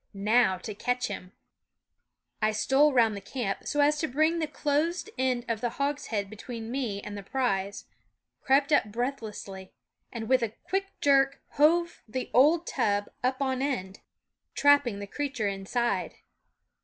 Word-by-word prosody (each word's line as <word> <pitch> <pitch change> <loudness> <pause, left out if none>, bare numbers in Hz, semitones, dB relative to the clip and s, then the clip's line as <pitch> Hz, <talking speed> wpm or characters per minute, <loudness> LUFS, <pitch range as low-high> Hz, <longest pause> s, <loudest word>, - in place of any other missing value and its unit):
Now 205 -1 +3
to 210 +4 -7
catch 245 +4 -1
him! 185 -2 -7 0.6
" - - -53
I 215 0 +2
stole 270 +7 +4
round 230 -5 +3
the 200 - -6
camp, 200 -1 -4
so 295 - +1
as 295 +1 +3
to 315 - 0
bring 315 +5 +2
the 315 - -1
closed 320 +8 -1
end 255 -2 0
of 230 -2 -2
the 240 - 0
hogshead 280 -8 -1
between 225 +2 -7
me 235 -7 -3
and 205 - -6
the 200 - -6
prize, 200 -4 -2 0.6
crept 275 +2 +3
up 290 - +4
breathlessly, 215 -5 -5 0.4
and 225 -2 -5
with 260 0 +4
a 230 - +1
H - - -35
quick 390 +1 -1 0.2
jerk 275 -1 +4
hove 340 +4 +2
the 250 +4 -4
old 310 +7 +5
tub 205 -8 0
up 260 +2 0
on 260 -1 -1
end, 200 -9 -2
THE - - -30
WOODS - - -16
trapping 285 -7 +4
the 200 - -5
creature 260 -1 -3
inside. 200 +5 -1
250 Hz, 170 wpm, -28 LUFS, 210-285 Hz, 0.6 s, old